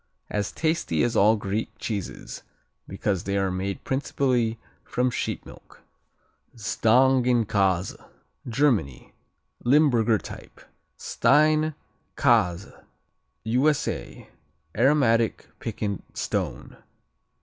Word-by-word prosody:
As 105 -1 -2
tasty 155 - 0
as 120 -1 0
all 110 +2 +5
Greek 105 +1 -3
cheeses 100 -5 -5 0.5
because 95 -1 -2
they 100 0 -1
are 95 -1 0
made 95 +1 -4
principally 130 -4 0 0.3
from 125 0 0
sheep - - -3
milk. - - -15 0.7
Stängenkase 115 -5 +2 0.5
Germany 110 - 0 0.5
Limburger 120 -5 +4
type. - - -11 0.4
Stein 155 +1 +2 0.4
Käse 95 -5 +1 0.6
U.S.A. 130 +6 -1 0.5
Aromatic, 115 -2 +2
piquant 100 -3 -4
"stone." - - -3
115 Hz, 85 wpm, -25 LUFS, 100-130 Hz, 0.7 s, all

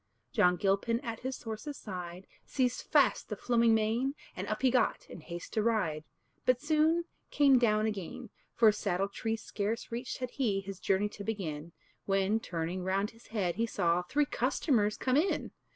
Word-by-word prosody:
John 180 0 +4
Gilpin 200 +5 +1
at 230 -4 -5
his 260 0 -5
horse's 230 +6 -5
side 180 -2 -7 0.2
Seized 250 -2 0
fast - - +3
the - - -2
flowing 235 -2 +3
mane, 230 +6 +1 0.2
And - - -4
up - - -3
he 260 - +5
got, 245 -3 +1
in - - -10
haste 170 +2 -8
to 215 - +2
ride, 185 -9 0 0.4
But 255 -1 +3
soon 310 +3 +2 0.3
came 275 -3 +5
down 215 -2 +3
again; 215 +2 -4 0.2
For 225 -2 +6
saddle 195 -2 -1
tree 225 +2 -2
scarce 220 +1 -3
reached 240 +2 -4
had 255 -1 -4
he, 220 -8 0
His 195 -1 -7
journey 195 +2 +1
to 205 - -9
begin, 170 -7 -4 0.4
When, 195 +2 +2
turning 175 -1 -3
round 195 +2 0
his 230 +1 -19
head, 195 -6 -1
he 230 +1 +1
saw 170 -4 +1
Three 285 +12 +1
customers 245 -5 +1
come 260 +1 +1
in. 350 +6 +1
215 Hz, 175 wpm, -31 LUFS, 190-245 Hz, 0.4 s, For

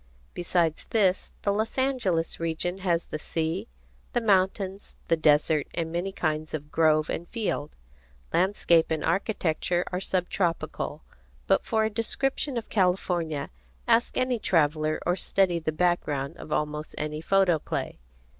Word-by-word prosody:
Besides 170 -2 0
this, 195 -4 +1
the 200 - +2
Los 220 +5 -2
Angeles 240 -12 0
region 165 +3 -2
has 175 -3 0
the 155 - -5
sea, 165 +7 -2 0.5
the 240 - +3
mountains, 195 -2 +1
the 165 - +5
desert, 150 -1 +3
and 165 -1 -2
many 175 +3 -2
kinds 155 -4 -2
of 150 0 -7
grove 155 -1 +3
and 170 - -4
field. 205 -10 -3 0.6
Landscape 175 -2 +3
and 160 -2 -1
architecture 180 -3 0
are 180 0 -2
sub 185 -2 0
tropical. 170 -4 -2 0.4
But - - +3
for 220 -1 +1
a 220 - 0
description 260 +4 -1
of 225 - -4
California, 180 -6 0 0.4
ask 235 - +3
any 255 -2 +1
traveller 155 -4 +2
or 175 - +2
study 185 -2 +1
the 160 -1 -1
background 155 -4 0
of 155 - -10
almost 150 0 -2
any 150 0 -3
photoplay. 180 - +1
175 Hz, 140 wpm, -27 LUFS, 155-195 Hz, 0.6 s, the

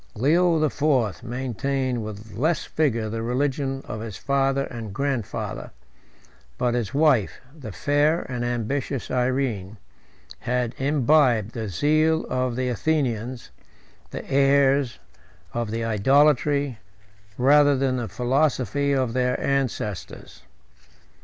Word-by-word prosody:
Leo 165 +8 +3
the 155 -2 +1
Fourth 130 -9 +1
maintained 130 0 -2
with 105 0 -8
less 155 +8 0
rigor 115 -8 +1
the 115 +1 -4
religion 135 +2 -1
of 110 - -5
his 110 -4 -6
father 135 0 +1
and 115 -6 -7
grandfather; 135 -6 -3 0.9
but 125 -1 0
his 120 -4 -1
wife, 140 -8 +2 0.2
the 130 -9 -8
fair 145 - +1
and 125 -1 -4
ambitious 120 +3 -2
Irene, 125 -6 -1 0.6
had 125 -1 -1
imbibed 135 -5 +3
the 110 -4 -5
zeal 155 - +2
of 130 -1 0
the 130 0 -1
Athenians, 125 -2 -1 0.6
the - - -7
heirs 140 -1 +3 0.6
of 120 -2 -2
the 115 +1 -3
Idolatry, 140 +3 +2 0.6
rather 145 +2 +5
than 130 -1 0
the 120 -2 -3
philosophy, 135 - 0
of 130 -4 0
their 125 0 0
ancestors. 130 -8 -3
130 Hz, 115 wpm, -24 LUFS, 115-140 Hz, 0.9 s, rather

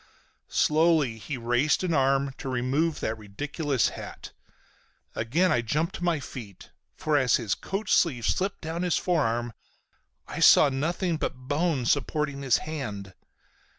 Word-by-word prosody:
Slowly 155 -7 +2
he 135 +5 -5
raised 120 +7 +1
an 175 -2 0
arm 135 -1 +2
to 135 - -5
remove 135 +6 0
that 110 0 -2
ridiculous 140 - -1
hat. - - -9 0.8
Again 155 +12 +1
I 120 - +2
jumped 150 +8 -1
to - - -8
my 170 -3 +1
feet. 115 -8 -10 0.2
For 155 -1 +1
as 125 -3 +3
his 110 -5 0
coat 195 +3 -4
sleeve 130 -9 +2
slipped 195 +1 -1
down 165 +1 -4
his 180 -2 +1
forearm 120 -9 0 0.7
I - - -6
saw 145 - +7
nothing 165 +5 -1
but 130 -3 -5
bone 145 -3 0
supporting 145 +2 0
his 135 -3 +3
hand. 105 -11 -5
140 Hz, 145 wpm, -27 LUFS, 120-160 Hz, 0.8 s, saw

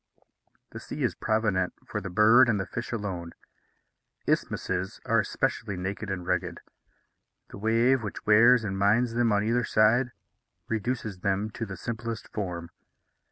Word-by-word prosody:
The - - -7
sea - - -5
is - - +1
provident 105 -4 0
for - - -4
the 95 - -5
bird 110 +6 +6
and 105 -3 +2
the 95 - -2
fish 120 +5 -6
alone. 95 -7 -4 0.9
Isthmuses 95 +2 -1
are - - +3
especially 100 - -2
naked 100 +3 -4
and 90 -2 -4
rugged; 90 0 -1 0.9
the - - -9
wave, 115 +4 +3
which 105 -3 -6
wears 115 +3 +6
and 100 -2 -3
mines 115 +4 +3
them 120 -1 +2
on 100 0 +2
either 120 +3 +1
side, 120 +4 +3 0.6
reduces 110 -3 -3
them 100 +2 -1
to 115 +1 -5
the 95 -1 -7
simplest 115 +2 -5
form. 90 -5 -5
105 Hz, 150 wpm, -27 LUFS, 95-115 Hz, 0.9 s, bird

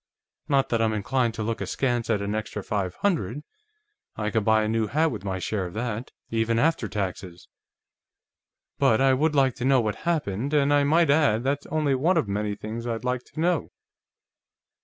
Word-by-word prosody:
Not 135 -2 +2
that 115 -1 +1
I'm 110 -1 +2
inclined 115 +2 0
to 110 - -3
look 115 +1 -3
askance 120 -3 -1
at 105 -3 +1
an 100 +1 -2
extra 105 -1 -4
five 95 -3 -2
hundred 150 - 0 0.7
I 105 0 -2
can 110 -2 +1
buy 110 0 +3
a - - -1
new 110 0 0
hat 155 +8 +1
with 105 -5 -6
my 95 -2 -2
share 95 0 -2
of 90 - -11
that, 115 +1 -3 0.2
even 115 0 +1
after 150 -3 +1
taxes 95 -3 -5 1.3
but 110 - +4
I 135 0 +4
would 150 +3 +1
like 135 -3 +3
to 125 - -3
know 135 -1 +4
what 110 -3 -1
happened. 145 - -1
And 145 0 +3
I 145 0 +4
might 160 +2 +4
add, 140 -7 +3
that's 140 +2 -1
only 150 -3 +1
one 165 +8 +2
of 155 - +1
many 105 +1 -2
things 115 +3 -6
I'd 115 -1 -3
like 125 0 -1
to - - -11
know." 170 0 +1
115 Hz, 195 wpm, -25 LUFS, 105-140 Hz, 1.3 s, but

